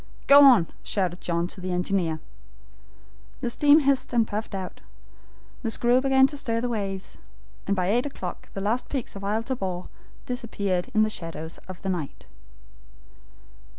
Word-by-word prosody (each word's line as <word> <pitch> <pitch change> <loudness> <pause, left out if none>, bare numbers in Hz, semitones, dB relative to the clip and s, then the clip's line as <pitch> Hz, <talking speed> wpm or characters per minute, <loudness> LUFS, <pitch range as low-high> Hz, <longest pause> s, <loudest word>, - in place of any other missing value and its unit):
"Go 285 +1 +9
on!" 250 -12 +7 0.2
shouted 185 -3 -2
John 170 -1 0
to 185 +1 -8
the 185 0 -3
engineer. 180 -3 0 1.2
The 245 -3 -2
steam 295 +5 +5
hissed 275 -1 +1
and 230 -2 +3
puffed 210 0 -4
out, 185 -1 -6 0.8
the 230 - -2
screw 240 +3 +3
began 265 0 +5
to 290 +2 -2
stir 230 -5 -1
the 245 +1 -1
waves, 195 -4 -4 0.5
and 200 - +2
by 185 -2 0
eight 245 +6 +2
o'clock 185 -10 -7
the 195 - -3
last 225 +5 -1
peaks 265 -7 -4
of 195 - -7
Isle 215 +3 0
Tabor 190 -8 -4 0.4
disappeared 205 -6 -2
in 215 - +5
the 215 - +1
shadows 165 -3 -6
of 185 -2 -8
the 195 - -2
night. 170 -7 -4
210 Hz, 160 wpm, -26 LUFS, 185-250 Hz, 1.2 s, Go